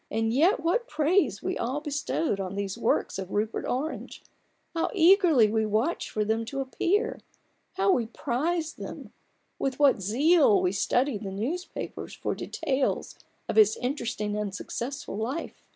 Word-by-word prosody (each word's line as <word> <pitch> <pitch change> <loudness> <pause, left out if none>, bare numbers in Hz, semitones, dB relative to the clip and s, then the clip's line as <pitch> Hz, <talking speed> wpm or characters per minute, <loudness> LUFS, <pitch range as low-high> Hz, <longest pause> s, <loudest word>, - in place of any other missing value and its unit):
And 225 +1 0
yet 320 - +3
what 385 +9 +1
praise 305 - +1
we - - -2
all 255 +5 -1
bestowed 295 -5 -1
on 190 0 -4
these 200 -1 -3
works - - 0
of 190 -1 -5
Rupert 215 +3 -2
Orange! 280 +6 -4 0.5
How 330 - 0
eagerly 335 - +6
we 220 0 +2
watched 220 +10 0
for 210 -1 -1
them 220 +2 0
to 275 +4 -5
appear; 385 - 0 0.5
how 385 +1 +2
we 240 -10 +1
prized 315 +8 -2
them; - - -8 0.5
with 265 -1 -1
what 280 -8 +4
zeal 270 - +4
we 180 - +1
studied 245 +3 0
the 200 - -4
newspapers 255 - -5
for - - -2
details 275 -4 -2 0.3
of - - -3
his 215 0 +6
interesting 240 -5 -2
and 210 -2 -3
successful 245 -1 -5
life 255 +10 -4
260 Hz, 150 wpm, -27 LUFS, 215-320 Hz, 0.5 s, eagerly